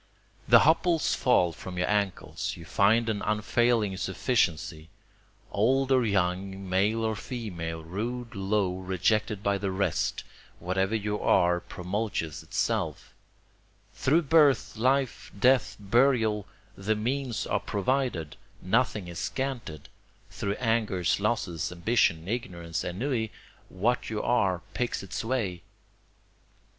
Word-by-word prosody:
The - - +8
hopples 165 +2 +3
fall 90 -10 +3
from 90 +3 -8
your 90 - +1
ankles 100 -3 -1
you 85 - -10
find 105 +8 +3
an 105 -2 -1
unfailing 110 -1 +1
sufficiency; 85 -5 -1 0.6
Old 130 +6 +2
or 130 -2 +4
young, 95 -1 -1
male 100 +5 +1
or 110 -1 0
female, 85 -10 -5
rude, 115 +8 -4
low, 95 -2 0
rejected 95 +3 0
by 100 -1 +1
the 100 0 -2
rest, 95 +1 -1 0.3
whatever 95 +4 0
you 105 -1 -2
are 90 0 +3
promulges 90 -3 -3
itself; - - -2 0.8
Through 160 +6 +2
birth, 145 -6 +4
life, 130 +3 0
death, 130 +3 +3
burial, 110 -1 +2 0.3
the 105 +3 -1
means 125 +2 -2
are - - 0
provided, 100 - -1 0.2
nothing 105 -1 0
is 85 -1 -6
scanted; 120 - -4 0.4
Through 100 - -2
angers, 110 -8 +1
losses, 100 -7 -1
ambition, 90 -2 +1
ignorance, 85 -7 -3
ennui, 110 +4 -2 0.4
what 120 +7 0
you 110 -1 -3
are 95 -8 +1
picks 120 -5 -2
its 95 - -4
way. 110 -8 -2
105 Hz, 115 wpm, -28 LUFS, 90-120 Hz, 0.8 s, The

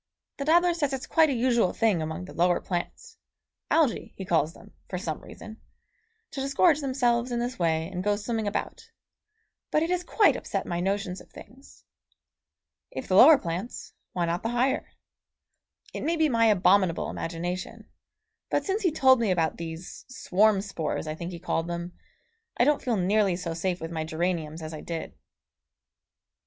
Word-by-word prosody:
The 280 - -4
dabbler 345 +3 +4
says 290 -5 -1
it's 265 0 -4
quite 320 -1 +4
a - - +1
usual 235 -5 +2
thing 215 -7 +2
among 160 +3 -4
the - - -11
lower 175 +1 +2
plants 175 -2 -5 0.5
Algæ 310 -8 +1
he 190 - -7
calls 165 -1 +1
them, - - -16 0.2
for 180 - -3
some 165 -4 -4
reason 220 +1 -11 0.7
to 270 - -4
disgorge 285 +3 +3
themselves 250 -3 +1
in 240 - -1
this 245 +1 -3
way 160 -1 +1
and 180 0 -5
go 205 +1 +2
swimming 220 +1 -3
about; 205 - -4 0.8
but 305 - +2
it 335 - -1
has 360 0 0
quite 420 +3 +3
upset - - -3
my 170 -1 -3
notions 195 0 -2
of - - -18
things. 270 +3 -15 1.1
If - - -7
the 185 - +1
lower 290 +9 +9
plants, 180 +4 -5 0.2
why 175 -1 0
not 170 +1 -1
the 225 - -2
higher? 255 +3 0 1.0
It - - -5
may 335 - 0
be 315 -2 +2
my 230 -3 +3
abominable 190 -3 +3
imagination, 175 +2 -5 0.6
but - - 0
since 400 +2 -1
he 360 -5 +2
told 265 -4 +5
me 230 -3 +1
about 165 -4 +1
these 165 +1 -8
swarm 215 -4 +2
spores 185 -7 -3
I 155 - -3
think 170 +2 -6
he 175 - -6
called 165 -1 -2
them 175 +1 -5 0.6
I - - +4
don't 295 +2 +3
feel 240 -4 0
nearly 195 0 +2
so 175 -2 -4
safe 175 +2 -2
with 165 +1 -6
my 160 -1 -2
geraniums 160 -1 -2
as 155 0 -6
I 155 - -7
did. 165 -1 -5
195 Hz, 175 wpm, -27 LUFS, 170-255 Hz, 1.1 s, lower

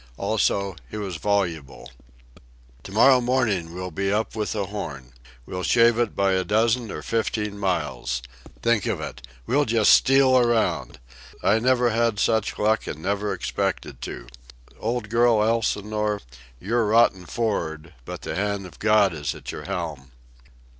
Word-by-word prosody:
Also, 100 -2 0
he - - -6
was 95 -5 -4
voluble. 80 -11 -2 0.9
"To 95 - -10
morrow 125 +5 +5
morning 115 -9 0
we'll 90 +1 -6
be 100 +4 -1
up 110 +2 -1
with 105 -1 -2
the 105 -3 -2
Horn. 75 -11 -7 0.3
We'll 90 - -5
shave 115 +3 +4
it 120 -3 0
by 100 -1 +2
a 95 0 +1
dozen 115 +3 +1
or - - -6
fifteen 110 -2 -1
miles. 75 -10 -2 0.4
Think 115 -4 +2
of - - -1
it! - - -7 0.2
We'll 145 - +2
just 110 -2 +4
steal 135 -1 +5
around! 120 -2 0 0.5
I 110 +3 +4
never 125 0 +2
had 115 -1 +1
such 110 0 +1
luck, 110 +1 +1
and 75 - -5
never 100 +2 -1
expected - - -3
to. - - -6 0.5
Old 115 0 -2
girl 115 0 +3
Elsinore, 105 -2 0 0.4
you're 110 - 0
rotten 105 -5 +3
for'ard, 85 -8 -3
but - - -7
the - - -4
hand 100 +1 -2
of 90 - -13
God 105 -4 +4
is 75 -3 -3
at - - -7
your - - -8
helm." 65 -1 -5
105 Hz, 155 wpm, -24 LUFS, 90-115 Hz, 0.9 s, morrow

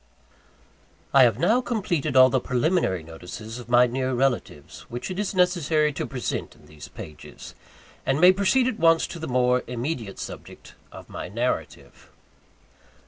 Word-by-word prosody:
I 135 -2 +8
have 115 -3 +1
now 210 - +2
completed 170 - -2
all 130 0 +7
the 130 - +2
preliminary 125 - 0
notices 90 +8 -9
of 120 -1 -11
my 120 0 +6
near 130 +1 -2
relatives, 130 -1 -2
which 120 +9 -5
it 185 - -5
is 205 -1 -2
necessary 165 -4 +2
to - - -4
present 125 -3 -4
in - - -21
these 75 -1 -12
pages; 75 - -11 0.5
and 135 +2 0
may 180 +2 +8
proceed 200 +7 +2
at 230 -4 -3
once 165 0 +4
to 170 - -8
the 160 - -5
more 125 0 +2
immediate 120 -4 -4
subject - - -10 0.2
of - - -12
my - - -7
narrative. 120 +5 -4
130 Hz, 155 wpm, -24 LUFS, 120-170 Hz, 0.5 s, I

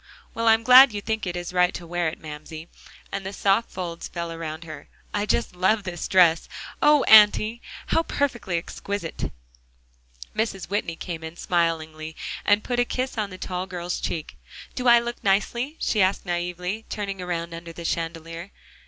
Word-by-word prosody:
Well, 230 -1 -1
I'm 225 0 +5
glad 250 0 +9
you 205 - -2
think 220 -1 -3
it 175 - -3
is 175 0 -5
right 180 0 +3
to 175 - -7
wear 175 0 -1
it, 160 - -4
Mamsie," 155 +1 -9 0.4
as 195 - -3
the 190 0 -5
soft 200 +3 +1
folds 175 -2 -5
fell 170 -1 -5
around 165 -1 -6
her. 155 -2 -10 0.2
"I 205 0 -1
just 235 - 0
love 195 +4 +2
this 175 -3 -4
dress. 175 -3 +4 0.3
Oh, 295 -2 +5
Auntie! 215 +2 +6 0.2
how - - +2
perfectly 240 - -1
exquisite!" 185 +1 -4 1.0
Mrs. 205 -4 -2
Whitney 200 -5 -1
came 165 -2 -6
in 160 +1 -7
smilingly 160 -2 -1 0.3
and 205 +1 +3
put 245 -1 -1
a - - +5
kiss 255 +2 -3
on 215 -3 -2
the 185 - -9
tall 185 0 -4
girl's 180 -1 -4
cheek. 155 - -4 0.4
"Do 250 -1 -2
I 240 0 +8
look 235 0 -3
nicely?" 235 +9 0
she 215 - +1
asked 190 +1 +2
naively, 180 +4 -3
turning 195 -2 -4
around 170 -1 -3
under 165 0 -8
the 170 0 -9
chandelier. 165 +2 -4
180 Hz, 175 wpm, -25 LUFS, 170-215 Hz, 1.0 s, glad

